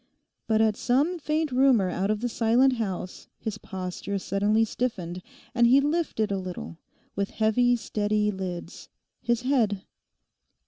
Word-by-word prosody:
But 220 -1 +3
at 220 -1 +3
some 295 - +1
faint 305 0 -1
rumour 250 -7 +4
out 190 +3 -1
of 215 0 0
the 245 - 0
silent 245 +3 +3
house 190 -4 -4
his 215 -2 -5
posture 190 +1 -5
suddenly 205 +3 +1
stiffened, 185 -7 -3 0.3
and 240 -1 +4
he 260 +3 +6
lifted 290 -8 0
a 195 - 0
little, 180 -2 -7 0.4
with 200 0 -1
heavy, 245 +3 +2
steady 210 -2 0
lids, 185 -3 -6 0.3
his 235 0 0
head. 225 -8 +1
220 Hz, 140 wpm, -26 LUFS, 195-245 Hz, 0.4 s, he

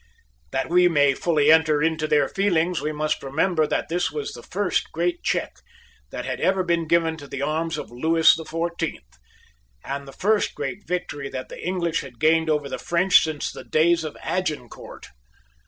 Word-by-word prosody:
That 135 - -2
we 180 +1 +5
may 145 -5 +3
fully 150 0 +2
enter 155 -2 +4
into 160 -1 0
their 150 -1 +3
feelings, 180 -3 0
we 155 - -2
must 155 0 -2
remember 155 +3 +1
that - - -1
this 175 +2 0
was 440 -1 -5
the - - -9
first - - -2
great 350 -1 -1
check - - -2 0.5
that - - -6
had - - -4
ever 190 0 +2
been 170 -2 0
given 165 -1 +2
to 145 -2 -10
the 140 0 -4
arms 160 +3 -1
of - - -7
Lewis 160 +7 +4
the 165 - -6
Fourteenth, 165 - -4 0.7
and 140 0 -5
the - - -9
first 210 +8 0
great 205 +2 -5
victory 145 -6 -3
that 130 -1 -6
the - - -9
English 170 -3 -1
had 125 -4 -12
gained 160 +2 +3
over 150 -2 0
the - - -5
French 180 +2 +4
since 155 -2 -3
the - - -9
day 160 +2 +3
of 160 -3 -3
Agincourt. 155 -10 -4
160 Hz, 185 wpm, -23 LUFS, 150-170 Hz, 0.7 s, we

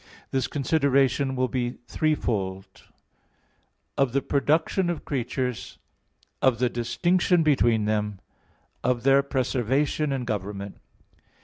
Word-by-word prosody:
This 130 -2 0
consideration 135 -2 +1
will 130 0 +1
be 125 -1 -2
threefold: 100 -11 -1
(1) - - -20 1.2
of 135 -3 +2
the 140 -1 +1
production 160 +6 +1
of 175 - -4
creatures; 125 -2 -3 0.6
(2) - - +4
of 125 -3 +3
the 125 +1 +1
distinction 175 +9 +1
between 120 -8 +3
them; 105 -2 -1 0.6
(3) - - +1
of 120 -2 -3
their 135 +1 +5
preservation 135 +2 0
and 130 -2 -2
government. 100 -2 -4
130 Hz, 120 wpm, -25 LUFS, 115-140 Hz, 1.2 s, their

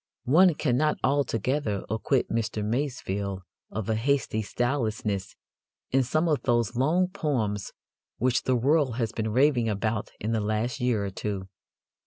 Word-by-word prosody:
One 170 +6 +5
cannot 150 +1 +1
altogether 130 -4 0
acquit 110 +4 0
Mr. 110 -2 -1
Masefield 100 -6 -2 0.3
of 110 -1 -4
a 110 - +1
hasty 120 -1 0
stylelessness 110 -4 -2 0.6
in 135 - +4
some 155 +7 +1
of 150 -3 +1
those 120 -2 +1
long 160 +9 +2
poems 120 - -2 0.5
which 125 +1 +2
the 130 - +3
world 135 0 +2
has 115 -3 -1
been 110 -1 -2
raving 125 -1 +3
about 105 0 -1
in 110 - -2
the 110 -1 +1
last 110 +5 -1
year 120 -5 +1
or 100 - -4
two. 95 -1 -4
120 Hz, 145 wpm, -27 LUFS, 105-135 Hz, 0.6 s, One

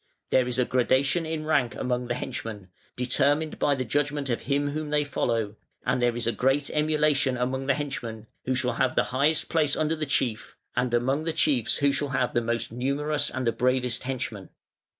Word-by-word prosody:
There 130 -1 +4
is 125 - -2
a 125 - +3
gradation 135 +6 +2
in 160 -1 -3
rank 140 -6 +1
among 125 -1 -2
the 120 - -1
henchmen, 105 -6 -6 0.3
determined 145 +5 +1
by 145 - +3
the 130 -1 -3
judgment 145 +2 0
of 115 - -1
him 145 0 0
whom 155 0 -4
they 150 0 +2
follow, 115 -6 -1 0.3
and 125 - +1
there 120 -1 +2
is 120 - -2
a 115 - +2
great 135 +4 +1
emulation 150 -3 +2
among 130 +2 -2
the 140 - +3
henchmen, 120 -7 -5 0.2
who 130 - 0
shall 125 -1 0
have 125 +2 0
the - - +4
highest 145 +4 +2
place 155 -3 +2
under 155 +1 +1
the 155 -1 -3
chief, 120 -5 -1 0.2
and 125 -1 +1
among 135 +6 0
the 165 - +1
chiefs 140 -7 +2
who 140 0 +3
shall 145 +1 -1
have 130 -2 0
the 120 - +2
most 115 -1 -2
numerous 140 +5 0
and 130 -1 -3
the 115 - +3
bravest 125 +1 +1
henchmen. 120 -6 -4
130 Hz, 200 wpm, -26 LUFS, 120-145 Hz, 0.3 s, There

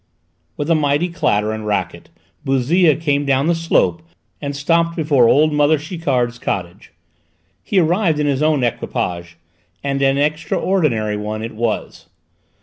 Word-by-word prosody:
With 145 - -3
a - - +6
mighty 150 +2 +1
clatter 105 - 0
and 110 -1 -5
racket 105 - -3 0.3
Bouzille 145 +5 +3
came 145 -3 0
down 135 0 +1
the 170 - +2
slope 165 0 +1 0.4
and 140 -1 -4
stopped 165 +3 +1
before 145 -7 +3
old 155 +1 +3
mother 150 +1 +3
Chiquard's 135 -7 -2
cottage. 90 -8 -5 0.7
He 200 - -2
arrived 175 -1 +2
in 150 - +1
his 140 -1 0
own 155 -4 +2
equipage, 85 -7 -3 0.5
and 140 0 -1
an 135 0 +2
extraordinary 150 - 0
one 105 +1 -4
it 115 - -6
was! 115 0 -3
145 Hz, 145 wpm, -18 LUFS, 120-160 Hz, 0.7 s, a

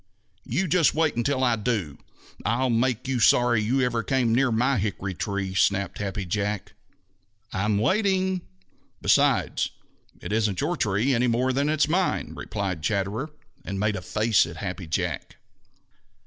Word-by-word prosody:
"You 175 +11 0
just 165 0 +3
wait 160 -1 +1
until 130 +3 0
I 120 -2 +3
do! 105 - -2 0.4
I'll 125 +2 +1
make 125 +2 0
you 130 -2 0
sorry 120 0 +4
you 125 +5 +1
ever 120 -2 +1
came 120 -1 +1
near 130 +1 +3
my 125 +2 +2
hickory 100 -1 -3
tree," 100 0 -3
snapped 100 -1 +1
Happy 100 -1 -3
Jack. 100 +2 -2 0.8
"I'm 105 +2 +1
waiting. 190 - +1 0.6
Besides, - - +2 0.5
it - - -7
isn't 105 -4 +1
your - - 0
tree 105 +6 +1
any 125 +1 +2
more 125 +2 +1
than 140 +3 +1
it's 155 -1 +2
mine," 180 +4 0
replied 95 -6 -4
Chatterer, 105 - -1 0.3
and 95 +1 -4
made 105 +1 +1
a 95 - -4
face 110 +1 +2
at 85 -1 -9
Happy 90 0 -5
Jack. 80 - -3
115 Hz, 150 wpm, -25 LUFS, 100-130 Hz, 0.8 s, sorry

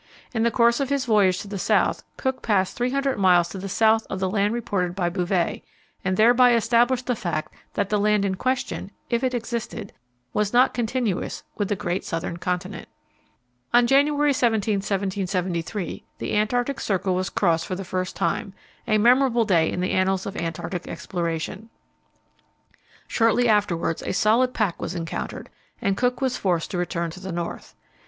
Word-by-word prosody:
In 225 - 0
the 235 - +4
course 235 +1 +3
of 275 -1 -1
his 280 -2 0
voyage 200 -5 +3
to - - -9
the 200 -1 -5
south - - +2 0.2
Cook 260 -1 -2
passed 195 -4 +1
300 265 +1 0
miles 180 -3 +4
to 190 - -7
the 195 +1 -5
south 220 +3 +3
of 190 - -3
the 190 -1 -1
land 205 0 +1
reported 195 -6 -2
by 180 -3 0
Bouvet, 180 -1 -1 0.4
and 185 0 0
thereby 245 +2 +6
established 240 +2 +2
the 250 - 0
fact 170 -7 -3 0.2
that 200 -1 0
the 210 - +1
land 210 0 +2
in 190 - 0
question 250 -1 -2 0.2
if 235 +2 +1
it 255 -1 +1
existed 230 -3 -4 0.4
was 210 0 0
not 250 +2 +5
continuous 235 -4 -2
with 205 - -1
the 205 - 0
great 180 -2 -2
southern 165 0 -4
continent. 180 +2 -3 0.9
On 240 0 +6
January 290 +3 +3
17, 220 -5 +1
1773, 190 -2 -2
the - - -3
Antarctic 245 +5 0
Circle 190 -3 0
was 185 +1 -1
crossed 165 -5 +1
for 185 - -2
the 195 +1 -6
first 185 0 -3
time 195 -1 -2 0.3
a 215 -2 +3
memorable 240 +1 +4
day 170 -6 +3
in 180 - -2
the 185 - 0
annals 190 0 +1
of 200 - -5
Antarctic 165 +2 -4
exploration. 170 +4 -4 1.4
Shortly 230 +1 +3
afterwards 200 -7 +1
a - - -3
solid 230 +6 +3
pack 205 -6 0
was 170 - -4
encountered, 165 -2 -5 0.3
and 195 -1 0
Cook 245 +4 0
was 260 -1 0
forced 175 -4 -1
to 180 - -2
return 170 -1 -2
to 185 - -10
the 190 0 -6
north. 170 0 -5
200 Hz, 175 wpm, -24 LUFS, 185-235 Hz, 1.4 s, thereby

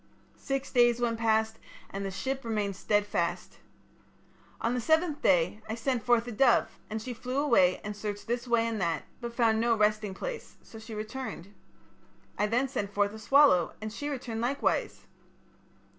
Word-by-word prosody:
Six 275 0 -3
days 240 -1 +4
went 230 -2 0
past 220 -1 +1 0.3
and 195 0 -4
the 195 - -2
ship 265 +8 -3
remained 210 -4 -1
stedfast. 205 -3 -1 1.0
On 230 - 0
the 250 - -1
seventh 315 +3 +2
day 180 +3 +2
I 220 - -2
sent 245 +1 -1
forth 240 0 +3
a 245 - -5
dove, 230 -1 +3
and 220 - -3
she 245 +3 -5
flew 250 +2 -5
away 235 -11 +4
and 210 -1 -5
searched 205 0 -5
this 240 +1 -2
way 235 -1 +3
and 225 -3 -2
that, 165 -4 0 0.2
but 235 -1 -6
found 225 -2 +3
no 235 0 +3
resting 210 -2 +1
place, - - -6
so 225 - -12
she 220 0 -9
returned. 215 -3 -6 0.8
I 210 - +1
then 245 +5 +1
sent 210 -7 -3
forth 205 0 +1
a 220 - -8
swallow, 270 - +4
and 215 0 -6
she 290 +6 -4
returned 240 -5 -4
likewise. 265 +4 -1
225 Hz, 175 wpm, -29 LUFS, 210-250 Hz, 1.0 s, days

